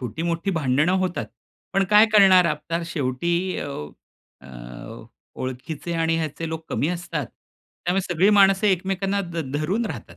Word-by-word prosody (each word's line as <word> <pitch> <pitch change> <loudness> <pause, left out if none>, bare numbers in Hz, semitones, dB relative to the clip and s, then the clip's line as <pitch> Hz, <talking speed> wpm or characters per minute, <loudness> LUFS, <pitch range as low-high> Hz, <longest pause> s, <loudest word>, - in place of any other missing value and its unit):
छोटी-मोठी 165 - -2
भांडणं 150 0 +1
होतात. 185 -1 -2 0.5
पण 195 0 +2
काय 210 +1 +7
करणार 190 -3 +7
आता 165 +2 -2
शेवटी 170 +5 -1
अ, - - -4 0.7
अ, 65 - -15 0.9
ओळखीचे 135 +6 -5
आणि 165 0 +1
ह्याचे 160 +1 -4
लोक 160 0 -5
कमी 150 - 0
असतात. 170 -5 -3 0.6
त्यामुळे 180 +3 +1
सगळी 185 +5 +4
माणसं 195 0 +5
एकमेकांना 195 +1 0
ध 170 -2 -4
धरून 190 +10 0
राहतात. 110 - -8
170 Hz, 135 wpm, -23 LUFS, 155-190 Hz, 0.9 s, काय